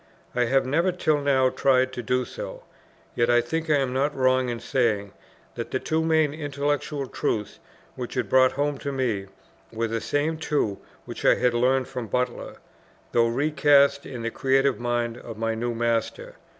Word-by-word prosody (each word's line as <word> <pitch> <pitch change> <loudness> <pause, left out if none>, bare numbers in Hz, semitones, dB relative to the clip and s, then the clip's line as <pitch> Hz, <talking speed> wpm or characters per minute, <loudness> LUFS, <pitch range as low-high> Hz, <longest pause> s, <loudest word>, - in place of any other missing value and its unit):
I 125 0 +2
have 135 +3 +2
never 165 +8 +1
till 155 -4 +1
now 135 -2 +3
tried 130 -1 +2
to 125 - -4
do 125 +2 0
so; - - -8 0.5
yet 120 0 +1
I 120 0 +5
think 160 +7 -3
I 150 - +5
am 135 -2 -1
not 140 +3 0
wrong 130 -1 +2
in 120 -1 -3
saying, 110 -8 0 0.4
that - - -5
the - - -1
two 160 +1 -1
main 160 -2 +2
intellectual 145 -1 -2
truths 105 -4 -3 0.3
which - - -6
it - - 0
brought 130 0 +4
home 145 0 -1
to 140 - -4
me, 120 -8 -1 0.4
were 115 0 -2
the 115 0 -3
same 155 +2 -1
two, 130 -11 -1 0.3
which - - -8
I - - +5
had 125 -1 +1
learned 130 +2 +2
from 125 -3 -5
Butler, 125 +4 -2 0.6
though 115 -1 +3
recast 140 +2 +3
in 125 -4 -6
the 115 - -2
creative 135 +1 +1
mind 120 -1 -1
of 115 -2 -9
my 115 0 -1
new 120 +1 -3
master. 120 - -1
130 Hz, 180 wpm, -25 LUFS, 120-145 Hz, 0.6 s, I